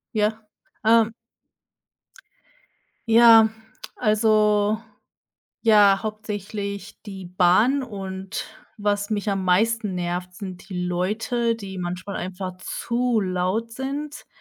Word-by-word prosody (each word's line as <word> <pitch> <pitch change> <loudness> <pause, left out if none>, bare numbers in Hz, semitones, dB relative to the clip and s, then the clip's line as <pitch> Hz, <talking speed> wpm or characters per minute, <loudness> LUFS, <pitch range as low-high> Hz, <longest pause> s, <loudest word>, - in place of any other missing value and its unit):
Ja, 215 +1 0 0.4
ähm. 225 0 +4 2.0
Ja, 225 -1 +8 0.5
also, 215 -1 +2 0.8
ja, 205 -3 +6
hauptsächlich 205 -2 -5
die 195 -3 -8
Bahn 185 +10 +3
und 195 -4 -6 0.3
was 205 0 -1
mich 210 -1 -1
am 195 -1 -1
meisten 210 +2 +1
nervt, 180 +1 -3
sind 185 -1 -9
die 180 -2 -3
Leute, 220 +6 -1
die 195 -3 -8
manchmal 180 +2 -5
einfach 185 0 -5
zu 235 +2 -1
laut 185 +4 -1
sind. 280 +4 -5
205 Hz, 95 wpm, -23 LUFS, 185-225 Hz, 2.0 s, Ja